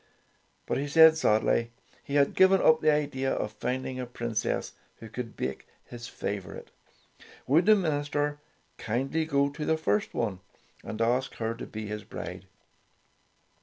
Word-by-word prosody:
But - - -1
he 145 - -2
said 160 +2 +7
sadly 115 -3 +2 0.3
he 140 - -5
had 140 -1 +3
given 190 0 +5
up 155 -2 +5
the 155 - +4
idea 140 -3 0
of 105 - -2
finding 130 +4 -3
a 125 - -4
princess 120 -2 -2 0.2
who 115 - -10
could 115 +1 -7
bake 65 +1 -4 0.2
his 120 -1 -9
favorite. 100 -3 -6 0.7
Would 160 +8 +3
the 215 - +8
minister 145 -4 -1 0.4
kindly 135 +8 -1
go 140 -2 +1
to 150 +1 -6
the 160 +1 +1
first 105 -9 0
one 105 -6 -1 0.4
and 110 - -5
ask 125 +3 0
her 115 0 -2
to 115 - -8
be 110 0 -6
his 105 0 -5
bride - - -8
130 Hz, 155 wpm, -28 LUFS, 115-150 Hz, 0.7 s, the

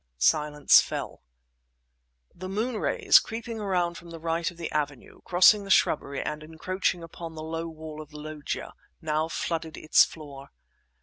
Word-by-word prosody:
Silence 150 - +5
fell. - - -6 1.1
The 185 +2 -8
moon 220 +4 -2
rays, - - +5
creeping 230 0 -6
around 180 -4 -1
from 170 - -14
the 165 - -8
right 165 +1 -1
of 175 - -14
the 170 - -5
avenue, 145 -3 -4
crossing 185 +4 +6
the 195 - -10
shrubbery 145 -6 +2
and 150 0 -4
encroaching 170 +3 -2
upon 165 0 -8
the 155 - -7
low 165 +1 -4
wall 155 -1 -8
of 150 - -12
the 150 - -11
loggia, 150 -1 -5 0.3
now 155 0 -1
flooded 165 -1 -3
its 155 - +5
floor. 140 -4 -8
165 Hz, 160 wpm, -27 LUFS, 155-180 Hz, 1.1 s, crossing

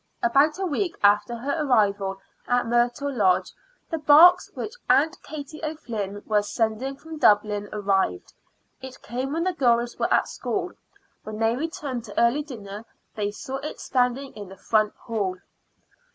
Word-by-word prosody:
About 275 +7 +3
a 385 - -2
week 345 +1 -1
after 205 +3 +4
her 280 +7 -2
arrival 200 -7 +1 0.3
at 245 0 +2
Myrtle 240 +4 0
Lodge 190 -7 +2 0.4
the 325 - -1
box 320 +5 +7
which 425 - -5 0.2
Aunt 305 +3 +3
Katie 310 +1 -9
O'Flynn 225 -10 -5
was 210 -1 0
sending 230 +4 -1
from 320 +2 -10
Dublin 210 -2 +3
arrived. 195 - -1 0.5
It 260 0 -10
came 255 +3 -4
when 330 +1 0
the 370 0 0
girls 240 -5 +1
were - - 0
at - - +3
school. - - -3 0.5
When 215 0 -7
they 225 +1 +1
returned 280 -4 -4
to 205 - -4
early 235 +5 +3
dinner 215 -8 -8 0.3
they 205 -2 -2
saw 260 +6 -6
it 290 +3 -7
standing 255 +1 0
in 205 -3 -9
the 190 - -12
front 215 +2 +1
hall. 200 -5 -3
240 Hz, 155 wpm, -25 LUFS, 210-290 Hz, 0.5 s, box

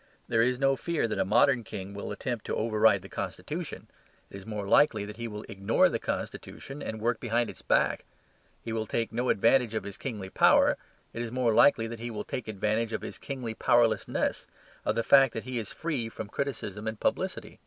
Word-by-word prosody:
There 115 -1 +2
is 125 +2 +2
no 135 0 +3
fear 165 -2 -1
that 110 - -3
a - - +2
modern 120 +4 +4
king 100 -1 -7
will 100 - -5
attempt 115 +2 -4
to - - -2
override 110 -3 +3
the - - -9
constitution; - - -5 0.5
it - - -8
is 95 - -11
more 105 -2 -4
likely 105 -2 +4
that 105 +1 -9
he 115 0 -4
will 105 -1 -7
ignore 100 +1 +2
the - - -2
constitution 135 +2 -5
and 110 -4 -5
work 115 +1 0
behind 120 0 0
its - - -13
back; - - +2 0.6
he 115 - -4
will 110 -1 -2
take 115 +1 -2
no 125 +2 0
advantage 115 +2 +3
of 110 - -1
his 100 0 -7
kingly 105 -8 -5
power; - - +5 0.4
it 115 - -4
is 120 -1 -4
more 125 -2 +1
likely 115 -1 +5
that 115 0 -6
he 120 +1 -4
will 110 - -4
take 120 - -5
advantage 110 +2 -1
of - - -3
his - - -7
kingly 125 -5 -5
powerlessness, 115 0 +1 0.4
of - - +1
the 115 - +1
fact 135 0 +6
that 115 - -3
he 130 -1 -3
is 110 - -6
free 140 -9 -3
from 110 -2 -7
criticism 110 -6 -4
and 110 -1 -3
publicity. - - -2
115 Hz, 210 wpm, -29 LUFS, 105-120 Hz, 0.6 s, fact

